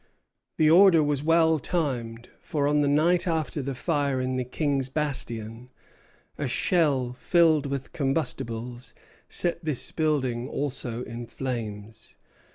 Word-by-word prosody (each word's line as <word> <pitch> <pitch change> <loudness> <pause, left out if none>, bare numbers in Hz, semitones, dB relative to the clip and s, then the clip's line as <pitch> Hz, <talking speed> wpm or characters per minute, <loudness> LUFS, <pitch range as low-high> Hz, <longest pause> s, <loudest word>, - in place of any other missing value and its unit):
The 155 - +4
order 170 0 +7
was 145 -2 0
well 160 0 +3
timed; 120 -7 -3
for 145 -3 -1
on 150 0 +3
the 145 - +2
night 170 +5 +3
after 160 -3 -1
the 135 0 -4
fire 140 -2 0
in 130 0 -1
the 130 - -1
King's 135 +1 -1
Bastion, 120 -5 -3 0.7
a - - -1
shell 140 -8 +1
filled 160 +1 +3
with 140 -1 -5
combustibles 125 -4 -2 0.3
set 170 0 -2
this 150 -5 -2
building 130 -6 0
also 125 -5 -3
in 115 +1 -7
flames. 110 -3 -6
140 Hz, 130 wpm, -26 LUFS, 125-155 Hz, 0.7 s, order